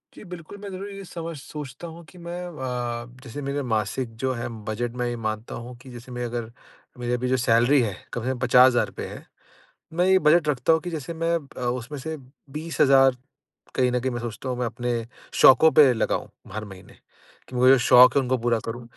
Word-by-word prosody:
जी, -, -, -11 dB
बिल्कुल, 180 Hz, +1 st, -10 dB
मैं 200 Hz, 0 st, -8 dB
ज़रूर 195 Hz, +2 st, -6 dB
ये 195 Hz, 0 st, -8 dB
समझ 165 Hz, -1 st, -6 dB
सोचता 145 Hz, +2 st, -8 dB
हूँ 165 Hz, +1 st, -11 dB
कि 180 Hz, -, -16 dB
मैं 175 Hz, +1 st, -6 dB
अ, 125 Hz, -6 st, -4 dB, 0.2 s
जैसे 135 Hz, +4 st, -7 dB
मेरे 140 Hz, +1 st, -2 dB
मासिक 115 Hz, +2 st, -1 dB
जो 130 Hz, 0 st, +1 dB
है 120 Hz, -1 st, -4 dB, 0.2 s
बजट 115 Hz, +2 st, -2 dB
में 125 Hz, -, -1 dB
ये 120 Hz, -, -2 dB
मानता 110 Hz, 0 st, -4 dB
हूँ 120 Hz, +1 st, -8 dB
कि 130 Hz, -, -13 dB
जैसे 120 Hz, +1 st, -11 dB
मैं 125 Hz, 0 st, -4 dB
अगर 120 Hz, -1 st, -4 dB, 0.5 s
मेरी 120 Hz, 0 st, -2 dB
अभी 125 Hz, +1 st, -1 dB
जो 130 Hz, -, +2 dB
सैलरी 120 Hz, +3 st, +4 dB
है, 105 Hz, -5 st, -2 dB, 0.2 s
कम 120 Hz, -, -3 dB
से 130 Hz, -, -1 dB
कम 125 Hz, -, -5 dB
₹50,000 125 Hz, 0 st, +4 dB
है। -, -, -10 dB, 0.7 s
मैं 180 Hz, +2 st, +2 dB
ये 190 Hz, 0 st, +5 dB
बजट 155 Hz, -1 st, +4 dB
रखता 140 Hz, +2 st, +2 dB
हूँ 160 Hz, -, +3 dB
कि 175 Hz, -, -6 dB
जैसे 165 Hz, +1 st, -5 dB
मैं 165 Hz, +1 st, 0 dB, 0.2 s
अ, -, -, -7 dB
उसमें 125 Hz, +4 st, -3 dB
से 160 Hz, +3 st, -5 dB, 0.3 s
20,000 135 Hz, -4 st, +3 dB, 0.6 s
कहीं 125 Hz, -1 st, +2 dB
न 125 Hz, -, +1 dB
कहीं 130 Hz, +1 st, -1 dB
मैं 120 Hz, -, -4 dB
सोचता 120 Hz, +2 st, -6 dB
हूँ 125 Hz, -1 st, -2 dB
मैं 125 Hz, -, 0 dB
अपने 120 Hz, -1 st, -3 dB, 0.3 s
शौक़ों 155 Hz, +5 st, +7 dB
पे 140 Hz, -4 st, +7 dB
लगाऊँ 110 Hz, -, -1 dB, 0.2 s
हर 110 Hz, 0 st, -4 dB
महीने 95 Hz, -2 st, -13 dB, 0.5 s
कि 125 Hz, -, -7 dB
मुझे 130 Hz, +2 st, +6 dB
जो 135 Hz, -, +6 dB
शौक़ 125 Hz, +1 st, +7 dB
है -, -, +6 dB
उनको 130 Hz, +1 st, 0 dB
पूरा 115 Hz, 0 st, +1 dB
करूँ, 120 Hz, +2 st, -5 dB
130 Hz, 215 wpm, -24 LUFS, 120-155 Hz, 0.7 s, शौक़ों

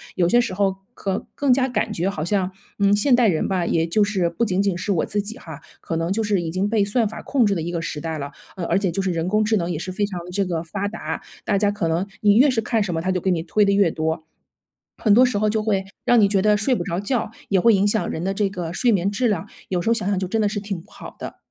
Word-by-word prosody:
有 175 Hz, -2 st, +2 dB
些 240 Hz, +7 st, +4 dB
时 235 Hz, -, -3 dB
候 195 Hz, -1 st, +1 dB, 0.2 s
可 195 Hz, 0 st, -3 dB
更 280 Hz, -3 st, +3 dB
加 260 Hz, +1 st, +2 dB
感 235 Hz, -5 st, -1 dB
觉 175 Hz, +3 st, 0 dB
好 155 Hz, -5 st, -3 dB
像， 190 Hz, 0 st, 0 dB, 0.3 s
嗯， 200 Hz, 0 st, +4 dB
现 245 Hz, +5 st, +4 dB
代 240 Hz, -2 st, +4 dB
人 165 Hz, -6 st, +1 dB
吧， 185 Hz, -2 st, 0 dB
也 165 Hz, 0 st, +1 dB
就 190 Hz, +6 st, +2 dB
是 200 Hz, -4 st, +1 dB
不 175 Hz, +7 st, -2 dB
仅 190 Hz, -4 st, 0 dB
仅 200 Hz, -3 st, +1 dB
是 185 Hz, +4 st, -2 dB
我 175 Hz, -, +1 dB
自 205 Hz, -, -1 dB
己 220 Hz, +4 st, -7 dB
哈， 160 Hz, -, -10 dB, 0.2 s
可 165 Hz, -, -4 dB
能 165 Hz, +2 st, -1 dB
就 220 Hz, +3 st, 0 dB
是 205 Hz, -3 st, +1 dB
已 165 Hz, -, -3 dB
经 185 Hz, +4 st, 0 dB
被 215 Hz, -1 st, +2 dB
算 215 Hz, +3 st, +1 dB
法 210 Hz, -, -7 dB
控 265 Hz, -5 st, +2 dB
制 205 Hz, -, +2 dB
的 170 Hz, -, -2 dB
一 170 Hz, +2 st, -3 dB
个 170 Hz, -, -2 dB
时 150 Hz, -2 st, -4 dB
代 160 Hz, -1 st, -3 dB
了。 140 Hz, -1 st, -5 dB, 0.2 s
呃， 180 Hz, -, -4 dB
而 175 Hz, +3 st, +2 dB
且 195 Hz, -3 st, 0 dB
就 195 Hz, -, -1 dB
是 190 Hz, -, 0 dB
人 165 Hz, 0 st, -2 dB
工 215 Hz, +3 st, +2 dB
智 215 Hz, +1 st, +2 dB
能 170 Hz, -2 st, -2 dB
也 165 Hz, -, -2 dB
是 185 Hz, +4 st, -5 dB
非 195 Hz, +3 st, -2 dB
常 185 Hz, -3 st, -5 dB
的 180 Hz, -, -9 dB
这 195 Hz, +2 st, 0 dB
个 170 Hz, -3 st, -2 dB
发 195 Hz, +4 st, -3 dB
达， 220 Hz, +2 st, -5 dB, 0.2 s
大 200 Hz, -, +2 dB
家 205 Hz, 0 st, +3 dB
可 205 Hz, -5 st, -1 dB
能 165 Hz, +4 st, 0 dB
你 205 Hz, -1 st, +5 dB
越 275 Hz, +4 st, +6 dB
是 250 Hz, -4 st, +1 dB
看 225 Hz, 0 st, 0 dB
什 200 Hz, -3 st, -1 dB
么 160 Hz, -, -1 dB
它 185 Hz, +2 st, 0 dB
就 185 Hz, -1 st, -1 dB
给 190 Hz, -, 0 dB
你 170 Hz, -3 st, 0 dB
推 205 Hz, +5 st, +2 dB
得 200 Hz, -, +3 dB
越 200 Hz, -4 st, +3 dB
多。 160 Hz, 0 st, -2 dB, 0.7 s
很 215 Hz, -, +3 dB
多 245 Hz, +4 st, +7 dB
时 245 Hz, -4 st, 0 dB
候 215 Hz, +1 st, +1 dB
就 215 Hz, 0 st, 0 dB
会 200 Hz, -3 st, 0 dB, 0.2 s
让 245 Hz, -, +5 dB
你 205 Hz, -, +5 dB
觉 195 Hz, -1 st, +2 dB
得 210 Hz, +1 st, +4 dB
睡 215 Hz, +6 st, +1 dB
不 175 Hz, -, -2 dB
着 175 Hz, -1 st, -2 dB
觉， 220 Hz, +3 st, -1 dB, 0.2 s
也 195 Hz, -, +3 dB
会 230 Hz, +3 st, +5 dB
影 195 Hz, +1 st, +2 dB
响 215 Hz, +1 st, 0 dB
人 160 Hz, -, -4 dB
的 195 Hz, +1 st, -1 dB
这 200 Hz, 0 st, 0 dB
个 175 Hz, -4 st, -5 dB
睡 245 Hz, +5 st, +2 dB
眠 195 Hz, -1 st, +1 dB
质 245 Hz, +4 st, +1 dB
量， 205 Hz, -7 st, -1 dB, 0.2 s
有 180 Hz, -, 0 dB
时 200 Hz, -, -1 dB
候 -, -, +5 dB
想 220 Hz, -5 st, -3 dB
想 200 Hz, -, +1 dB
就 185 Hz, -, -2 dB
真 220 Hz, +4 st, 0 dB
的 210 Hz, -, +2 dB
是 205 Hz, 0 st, -3 dB
挺 200 Hz, -4 st, -5 dB
不 -, -, -23 dB
好 -, -, -11 dB
的。 -, -, -7 dB
195 Hz, 330 characters per minute, -22 LUFS, 175-210 Hz, 0.7 s, 多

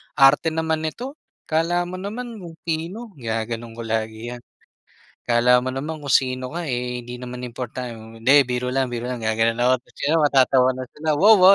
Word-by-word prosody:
"Arte 135 Hz, +4 st, +6 dB
naman 160 Hz, -1 st, 0 dB
nito, 260 Hz, -, -6 dB, 0.3 s
akala 165 Hz, +3 st, +2 dB
mo 185 Hz, +1 st, -6 dB
naman 225 Hz, +4 st, -6 dB
kung 170 Hz, -2 st, -9 dB
sino!" 175 Hz, +8 st, -4 dB
Ginaganon 115 Hz, 0 st, -3 dB
ko 115 Hz, -, -6 dB
lagi 110 Hz, +1 st, -3 dB
'yan. 125 Hz, -, -7 dB, 0.9 s
"Akala 125 Hz, +1 st, +4 dB
mo 130 Hz, -, -2 dB
naman 150 Hz, +4 st, -4 dB
kung 140 Hz, -3 st, -2 dB
sino 130 Hz, 0 st, +1 dB
ka, 170 Hz, -2 st, -3 dB
eh, 125 Hz, 0 st, -2 dB
hindi 120 Hz, +1 st, -8 dB
naman 125 Hz, 0 st, -7 dB
important 120 Hz, -2 st, -7 dB
hindi 130 Hz, +4 st, +5 dB
biro 125 Hz, 0 st, -2 dB
lang, 135 Hz, +1 st, +1 dB
biro 120 Hz, +1 st, -3 dB
lang 125 Hz, -, -3 dB
ga 110 Hz, -, +2 dB
ganon 115 Hz, +1 st, +2 dB
ako," 130 Hz, -, +5 dB
ta's -, -, -26 dB
ayon, 160 Hz, +3 st, +3 dB
matatawa 130 Hz, -3 st, +4 dB
na 130 Hz, -, -4 dB
sila. 155 Hz, +1 st, -3 dB
"Wow, 205 Hz, +3 st, +7 dB
130 Hz, 185 wpm, -23 LUFS, 120-160 Hz, 0.9 s, Wow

